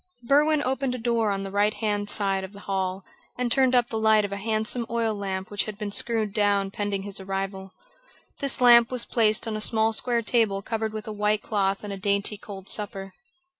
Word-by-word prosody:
Berwin 290 +4 +3
opened 260 0 -1
a - - -4
door 230 -2 0
on 195 -1 -2
the 195 - -6
right 205 +1 +1
hand 205 -2 -1
side 195 -2 0
of 190 +1 -8
the 200 - -11
hall 190 -1 -3 0.3
and 245 -1 -1
turned 260 0 +3
up 245 -1 +3
the 220 - -2
light 220 -1 +4
of 200 - -6
a - - -2
handsome 220 +3 -1
oil 230 -1 0
lamp 195 0 -4
which 205 - 0
had 215 -2 -7
been 210 -1 -4
screwed 220 -1 -1
down 200 -2 +1
pending 200 -1 -3
his 200 -1 -4
arrival. 195 0 -5 0.7
This 275 -1 -1
lamp 240 -1 +7
was 250 -2 0
placed 220 0 +1
on 220 - -2
a 215 - -3
small 220 +1 +2
square 235 +1 0
table 215 -4 +1
covered 220 0 -2
with 215 0 -6
a 215 - -4
white 210 0 0
cloth 195 -2 -1
and 205 -1 -5
a - - -6
dainty 200 +2 0
cold 200 -2 -10
supper. 195 -2 -1
210 Hz, 215 wpm, -25 LUFS, 200-230 Hz, 0.7 s, lamp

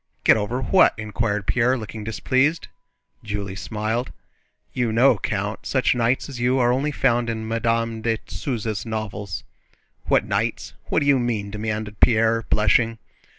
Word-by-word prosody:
"Get - - +6
over 110 +5 -2
what?" 190 - +4
inquired 105 -1 -2
Pierre, 125 +4 +2
looking 110 -1 -7
displeased. 130 +8 0 0.5
Julie 100 -2 -4
smiled. 110 +4 -3 0.6
"You 120 -3 0
know, 120 0 +4
Count, 105 +1 -3
such 130 -2 +2
knights 120 +1 0
as 135 -4 -8
you 125 +2 +2
are 120 -1 +3
only 140 +4 0
found 120 -4 +1
in 110 -1 -3
Madame 115 0 -1
de 115 0 0
Souza's 110 -5 -3
novels." 105 -8 -5 0.6
"What - - +2
knights? - - -2
What - - +1
do - - 0
you 140 -2 +4
mean?" 110 -5 -2
demanded 105 -1 -4
Pierre, 115 0 +4
blushing. 115 +2 +3
115 Hz, 150 wpm, -23 LUFS, 105-125 Hz, 0.6 s, Get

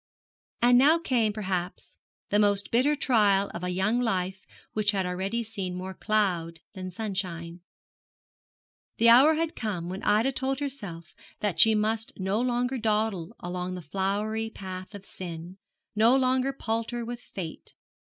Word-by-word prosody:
And 245 0 +7
now 300 +5 +6
came, 245 -9 +1
perhaps, 185 -4 -4 0.3
the 205 - +4
most 200 -1 +2
bitter 260 +6 +3
trial 205 -8 +3
of 170 - -6
a 180 - -1
young 190 +6 +1
life 190 -4 -2 0.3
which 215 0 +2
had 190 -2 0
already 190 +6 -2
seen 195 -5 -5
more 185 +1 -5
cloud 180 -7 0
than 185 -2 -6
sunshine. 180 -4 -4 1.4
The 235 - +6
hour 270 +7 +7
had 325 0 -1
come 185 -6 -3
when 190 +2 -5
Ida 215 +6 +3
told 270 +1 -2
herself 205 - -6 0.3
that 205 -5 -1
she 220 -1 +7
must 220 +1 0
no 195 +3 0
longer 250 +1 0
dawdle 215 -3 0
along 180 +1 -4
the 180 - -6
flowery 205 +6 -1
path 185 -1 -8
of 200 -1 -10
sin, 175 0 -8 0.4
no 230 +5 +5
longer 260 0 +2
palter 230 -1 -3
with 240 +1 -6
fate. 175 -9 -8
210 Hz, 150 wpm, -27 LUFS, 185-235 Hz, 1.4 s, And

